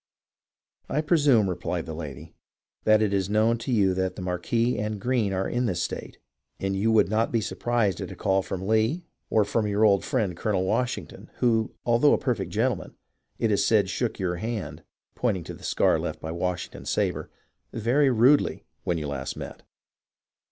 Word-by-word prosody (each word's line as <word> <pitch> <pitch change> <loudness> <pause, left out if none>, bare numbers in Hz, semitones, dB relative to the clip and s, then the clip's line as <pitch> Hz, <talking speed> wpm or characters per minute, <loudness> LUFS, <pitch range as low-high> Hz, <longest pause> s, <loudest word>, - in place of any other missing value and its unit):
"I 150 - +1
presume," 145 - +4
replied 90 -1 -3
the 80 - -6
lady, 75 -4 -8 0.5
"that 110 0 +5
it 100 -2 0
is 95 -1 0
known 110 +2 +2
to 125 - -4
you 100 -5 +3
that 95 -1 -1
the - - -6
Marquis 105 +7 0
and 105 0 -2
Greene 120 -2 0
are 95 0 -1
in 120 0 0
this 90 -4 -1
state, - - -5 0.4
and 95 0 -1
you 105 +4 +1
would 110 -1 +4
not 110 +3 +1
be 115 - +2
surprised 110 -2 0
at - - -5
a - - -7
call 95 0 +1
from 95 0 -5
Lee 110 +11 +1 0.2
or 110 -2 +3 0.2
your 105 +1 +2
old 100 -2 +4
friend. 105 -9 -1
Colonel 95 +1 0
Washington, 125 +6 -2
who, 115 -2 +1
although 120 +5 +4
a - - +4
perfect 105 -9 -2
gen 115 +8 +1
tleman, 95 -6 -7 0.4
it 115 - +1
is 100 -1 +2
said 105 -4 +3
shook 120 -3 -2
your 90 -3 -1
hand 110 +2 -4 0.3
(pointing 105 -8 -1
to - - -7
the - - -13
scar - - +2
left - - -4
by 80 - -5
Washington's 90 +1 -4
sabre) - - -1 0.4
very 125 +6 +2
rudely 130 +4 +3 0.2
when 85 - 0
you 75 -2 -3
last 70 -2 -4
met." - - -8
105 Hz, 185 wpm, -26 LUFS, 95-115 Hz, 0.5 s, that